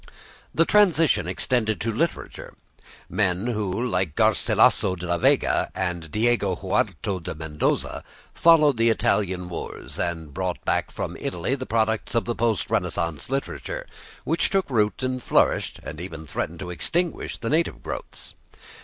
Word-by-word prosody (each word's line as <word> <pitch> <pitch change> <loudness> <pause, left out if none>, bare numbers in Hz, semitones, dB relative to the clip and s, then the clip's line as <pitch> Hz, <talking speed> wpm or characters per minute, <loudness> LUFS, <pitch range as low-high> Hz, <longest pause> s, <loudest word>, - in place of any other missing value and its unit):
The 165 - +3
transition 175 -7 +4
extended 110 -6 +1
to 115 - 0
literature. 165 +10 -3 0.5
Men 95 0 0
who, 105 -5 -1
like 90 - -1
Garcilaso 95 - +3
de 90 0 -7
la 85 0 0
Vega - - +3
and 90 -3 -2
Diego 105 -1 +1
Hurtado 95 +2 -1
de 80 - -6
Mendoza, 75 -1 -2 0.3
followed 155 -5 +5
the 115 +1 +4
Italian 95 -5 +1
wars, 85 - -6
had 80 -4 -3
brought 90 +1 -3
back - - +1
from - - -5
Italy 90 +9 -2
the 130 -1 -3
products 110 0 0
of 115 - +2
the 120 - -1
post 115 -3 0
Renaissance 85 -2 -1
literature, - - -3 0.4
which - - +1
took 195 -2 +1
root 105 +1 +1
and 130 0 -1
flourished - - +2
and 80 +2 -7
even 80 -4 -7
threatened 85 +3 -4
to 90 -2 -5
extinguish 170 - -2
the 115 - -3
native 155 - 0
growths. - - -7
105 Hz, 145 wpm, -24 LUFS, 90-125 Hz, 0.5 s, followed